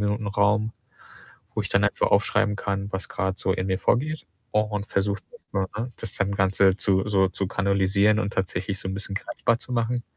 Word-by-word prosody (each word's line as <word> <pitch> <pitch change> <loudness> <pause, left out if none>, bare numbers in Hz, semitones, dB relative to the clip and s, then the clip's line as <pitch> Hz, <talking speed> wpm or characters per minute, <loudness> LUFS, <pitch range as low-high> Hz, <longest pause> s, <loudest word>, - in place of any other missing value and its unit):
Minuten 105 +1 -1
Raum, 105 +2 +2 0.8
wo - - 0
ich - - -4
dann - - +3
einfach - - +2
aufschreiben 105 0 +3
kann, 100 0 -3
was 95 - -3
grad 95 -1 -2
so 95 - +1
in 95 0 -2
mir 95 0 +1
vorgeht 150 +3 0 0.3
und 105 -1 0
versuche 100 +1 0
das 240 - -15
so 100 - 0 0.2
ne? 120 +2 -3
Das - - -6
dann 100 0 0
Ganze 95 0 +3
zu 95 0 +1
so 95 -2 +3
zu 95 0 -3
kanalisieren 100 +2 +2
und 100 -1 -2
tatsächlich 95 +1 -1
so 95 - -4
'n 95 - -3
bisschen 100 0 -3
greifbar 115 +2 0
zu 130 - -7
machen. 120 +1 0
100 Hz, 200 wpm, -25 LUFS, 95-105 Hz, 0.8 s, dann